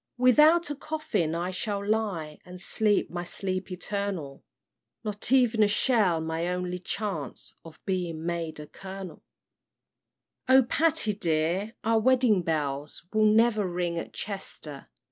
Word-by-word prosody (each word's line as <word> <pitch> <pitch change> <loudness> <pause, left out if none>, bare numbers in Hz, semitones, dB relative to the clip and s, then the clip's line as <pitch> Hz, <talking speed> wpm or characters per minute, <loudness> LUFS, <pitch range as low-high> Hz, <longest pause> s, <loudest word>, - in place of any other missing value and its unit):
"Without 300 +7 +5
a - - -3
coffin 270 - -2
I 175 +2 -2
shall 200 +1 -3
lie 195 -9 -1
And 180 0 -11
sleep 210 +2 +2
my 175 0 -3
sleep 185 +1 -3
eternal: 180 -6 -4 0.6
Not 210 +1 -1
ev'n 245 -4 +4
a 210 - +6
shell 205 -5 +2
my 160 +1 -2
only 180 0 -2
chance 185 - -3
Of 160 -1 -12
being 175 -4 -2
made 170 -2 -3
a 150 - -7
Kernel! 190 +3 -9 1.3
"O 260 0 +7
Patty 260 -4 +2
dear, 180 +3 0
our 225 +1 +3
wedding 245 -4 +4
bells 150 -2 -3
Will 215 0 +4
never 215 -1 +4
ring 175 -1 -2
at - - -7
Chester! 165 -8 -6
190 Hz, 135 wpm, -27 LUFS, 170-220 Hz, 1.3 s, O